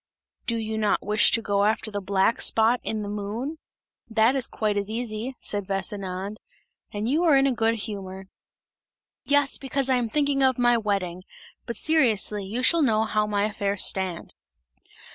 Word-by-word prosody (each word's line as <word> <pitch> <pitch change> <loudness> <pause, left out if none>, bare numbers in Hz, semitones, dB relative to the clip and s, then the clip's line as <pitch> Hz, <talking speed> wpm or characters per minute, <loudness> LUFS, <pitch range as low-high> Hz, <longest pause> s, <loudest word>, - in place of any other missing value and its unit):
"Do 230 - +1
you 220 -1 -3
not 210 -1 0
wish 210 +2 +4
to 230 - +3
go 200 -1 +1
after 215 +1 0
the 205 0 -3
black 195 +3 +1
spot 225 +2 +3
in 215 -1 -3
the - - -5
moon? 215 +9 -4 0.5
That 225 +3 +3
is 265 -3 +1
quite 215 -2 -2
as 200 0 -2
easy," 230 +2 -4
said 205 -2 -3
Vesinand; 195 0 -4 0.5
"you 240 +11 0
are 310 -5 +5
in 270 - +4
a 270 - +2
good 230 -1 +1
humour!" 195 -3 -6 1.0
"Yes, 285 -1 +2
because 270 0 -1
I 255 - +4
am 240 -2 -1
thinking 285 0 +1
of 260 -2 +3
my 240 -1 +4
wedding; 195 -5 -2 0.5
but 235 - -4
seriously, 225 -10 +1
you 225 +6 -4
shall 335 +5 +4
know 220 -6 +3
how 215 -1 0
my 205 -1 0
affairs 205 -2 0
stand!" 185 -3 -1
220 Hz, 170 wpm, -25 LUFS, 205-250 Hz, 1.0 s, are